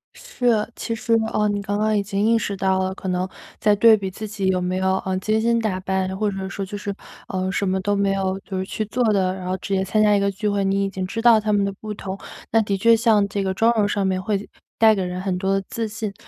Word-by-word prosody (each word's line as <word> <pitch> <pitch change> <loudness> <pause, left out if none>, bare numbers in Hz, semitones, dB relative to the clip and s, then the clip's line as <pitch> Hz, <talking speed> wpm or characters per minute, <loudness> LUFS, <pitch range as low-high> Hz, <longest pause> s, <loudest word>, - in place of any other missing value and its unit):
是， 245 - 0
其 230 - -3
实， 230 +1 -1 0.2
呃， 210 0 +2
你 205 0 -1
刚 205 +1 -2
刚 215 0 +1
已 - - +2
经 200 +1 -1
意 230 +1 +4
识 205 -2 -2
到 190 0 +1
了， 190 0 -1
可 190 - -7
能 180 +1 0 0.3
在 210 -1 +3
对 220 +1 +7
比 195 -1 -4
自 215 +3 -7
己 200 -2 -3
有 185 -1 +2
没 185 +1 -1
有， 190 0 +1
呃， 190 0 -1
精 215 +3 +1
心 235 +1 +2
打 210 -5 -1
扮， 190 0 -2
或 210 0 0
者 190 -1 -4
说 195 - -4
就 205 +2 -6
是， 200 0 -4 0.3
呃， 185 -1 -2
什 200 0 -1
么 190 +1 0
都 205 +1 0
没 200 -1 +1
有 190 0 -1
就 195 -1 -6
是 185 - -2
去 215 +2 -3
做 245 +4 -1
的， 185 -2 +1
然 185 -1 -7
后 185 - -1
直 195 - -5
接 190 - +1
参 215 +3 +1
加 210 -1 +5
一 - - +3
个 200 0 +1
聚 210 +2 -2
会， 200 -1 0
你 195 +1 +1
已 - - -2
经 190 -1 -4
知 225 +5 -4
道 235 -2 +6
它 215 0 -1
们 205 -1 +3
的 200 - -1
不 215 +2 -7
同。 195 -1 -6 0.3
那 225 0 +4
的 200 -2 -1
确 230 +4 +5
像 220 -3 +3
这 200 0 -2
个 190 -1 -1
妆 225 +4 +3
容 210 -2 +2
上 200 -1 0
面 185 -1 0
会 205 +1 -2 0.3
带 220 -1 +7
给 195 -3 -1
人 180 0 -4
很 190 -2 -1
多 195 +1 +1
自 225 -1 -2
信， 215 -1 -5
200 Hz, 300 characters per minute, -22 LUFS, 190-215 Hz, 0.3 s, 对